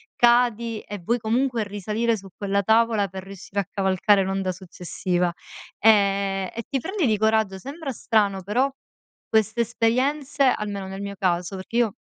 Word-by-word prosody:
cadi 235 -2 +3
e 205 - -7
vuoi 235 +8 0
comunque 235 +1 0
risalire 210 +3 -1
su 195 0 -11
quella 200 0 0
tavola, 220 -1 +3
per 190 +1 -8
riuscire 195 +1 -4
a 195 - -7
cavalcare 195 +1 +2
l'onda 190 -1 -1
successiva. 180 -1 -2 0.5
Ehm, 200 -3 +3
e 230 - -5
ti 275 -2 -1
prendi 375 - -1
di 215 -3 +2
coraggio, 220 -2 +2
sembra 280 - -6
strano 205 -5 +1
però 245 +8 +1 0.6
queste 220 +1 +2
esperienze 260 +5 +1
almeno 205 -6 0
nel 195 +1 -6
mio 200 0 -5
caso, 180 0 0
perché 190 +5 -5
io 230 -4 +2
210 Hz, 155 wpm, -24 LUFS, 195-235 Hz, 0.6 s, cadi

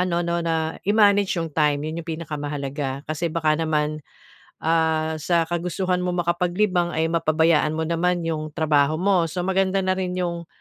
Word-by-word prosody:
ano 175 -1 +1
'no, 170 0 0
na 160 -1 -1
i 205 - +3
manage 205 -2 +4
'yong 165 -1 -2
time, 150 -1 +1
'yon 160 +2 -4
'yong 170 - -12
pinakamahalaga. 145 -3 -4
Kasi 155 +2 -2
baka 155 -1 +1
naman, 155 -1 0 0.7
ah, 160 -1 +1
sa 170 +1 +2
kagustuhan 180 +1 -1
mong 180 -1 -1
makapaglibang 175 +1 +1
ay 160 - +1
mapabayaan 160 -1 +2
mo 160 - -1
naman 175 +1 0
'yong 155 -2 -3
trabaho 155 -1 +2
mo, 185 -3 +3
so 180 +3 -3
maganda 190 0 +1
na 185 - +2
rin 185 -1 -2
'yong, 170 -2 -3
165 Hz, 170 wpm, -23 LUFS, 155-180 Hz, 0.7 s, manage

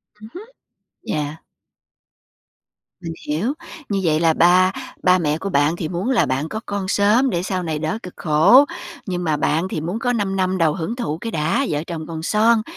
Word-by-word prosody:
Ừm 215 +1 -12
hứm, 420 +6 -9 0.6
yeah. 150 +1 -4 1.6
Mình 165 -1 -5
hiểu. 180 - 0 0.4
Như 200 -1 0
vậy 155 -2 +2
là 165 -1 +3
ba 180 +3 +5 0.3
ba 180 0 +5
mẹ 155 -3 0
của 195 +4 -4
bạn 145 +1 +2
thì 165 -3 -4
muốn 185 +8 -3
là 250 - +3
bạn 135 +5 -2
có 220 - -4
con 200 -2 -3
sớm 215 +7 +3
để 175 -3 -1
sau 185 -1 -2
này 155 -2 -2
đỡ 160 +8 -2
cực 180 - -8
khổ, 175 - +5 0.4
nhưng 180 -2 -3
mà 155 -3 0
bạn 165 +5 0
thì 155 - -3
muốn 180 +8 -3
có 245 0 0
5 200 -4 -1
năm 185 0 0
đầu 160 -3 +2
hưởng 195 +6 -4
thụ 160 -11 -3
cái 230 +5 -5
đã, 160 - 0
vợ 150 +1 -1
chồng 160 -3 -5
còn 160 -1 -6
son 220 +3 +3
180 Hz, 200 wpm, -21 LUFS, 160-210 Hz, 1.6 s, ba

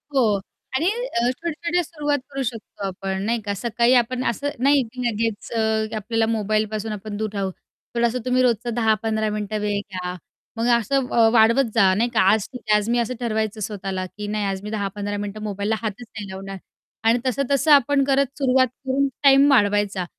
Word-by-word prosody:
हो. 215 -7 +3 0.4
आणि 315 +6 +1
अ, 435 - -1
छोट्या-छोट्या 335 +4 -2
सुरुवात 295 -3 -1
करू 275 - -3
शकतो 225 -4 -6
आपण, 190 +1 -4
नाही 230 +1 0
का. 200 - -1
सकाळी 235 +3 +2
आपण 255 +2 -4
असं 280 +5 -2
नाही 280 0 +5
की 255 - -6
लगेच, 225 -1 -2
अ, 220 -1 0
आपल्याला 225 +2 0
मोबाईलपासून 215 0 -1
आपण 210 0 -6
दूर 220 0 -2
राहू. 195 -2 -2 0.4
थोडंसं 235 +1 +1
तुम्ही 255 0 +2
रोजचा 240 -1 +1
10 225 -2 +3
ते - - -13
15 220 -1 0
मिनिटं 210 0 -3
वेळ 205 -1 0
घ्या. 185 -3 -5 0.4
मग 230 +1 0
असं 265 +4 0
व 230 -1 +4
वाढवत 230 +2 +4
जा, 195 -4 +5
नाही 235 +4 +1
का. 220 - +2
आज 215 -2 +1
ठीक 250 -2 -8
आहे, 210 - +6
आज 210 +2 -2
मी 240 0 +2
असं 235 +2 -1
ठरवायचं 220 -2 -2
स्वतःला, 195 -2 -3
की 205 +3 -8
नाही 210 -1 -1
आज 195 -1 -2
मी 210 - -5
10-15 205 -1 -3
मिनिटं 205 +1 -5
मोबाईलला 205 +1 -1
हातच 220 +2 -4
नाही 215 -3 -8
लावणार. 195 +1 -7 0.5
आणि 230 +2 +4
तसं-तसं 275 +3 +1
आपण 285 0 +5
करत, 275 0 +3
सुरुवात 260 -2 +3 0.2
करून 270 +1 +1 0.2
टाईम 275 0 +7
वाढवायचा. 205 -5 +2
220 Hz, 190 wpm, -22 LUFS, 205-255 Hz, 0.5 s, टाईम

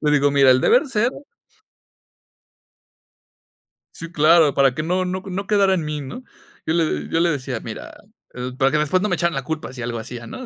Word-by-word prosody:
Le 150 - +1
digo: 145 -1 +3
"Mira, 140 -2 +5
el 130 0 +4
deber 465 - +3
ser" 235 0 0 2.8
Sí, 165 -1 -8
claro. 160 -1 +4
Para 135 -2 +3
que 155 - -3
no 180 +3 0
no 185 +1 -4
no 195 +1 -5
quedara 200 -2 +3
en 170 -4 -2
mí, 150 -1 -4
¿no?, 145 - -8 0.4
yo 160 - 0
le 165 -2 -1
yo 165 - 0
le 170 0 +3
decía: 135 -5 -4
"Mira, - - -8 0.7
para 135 0 +2
que 150 - +2
después 150 +5 +1
no 210 - 0
me 180 - +1
echaran 170 -1 0
la 135 -2 -3
culpa, 160 -3 -5
si 125 -2 -8
algo 115 0 -4
hacía", 120 +1 -8
¿no?, 255 - -8
155 Hz, 200 wpm, -21 LUFS, 135-185 Hz, 2.8 s, Mira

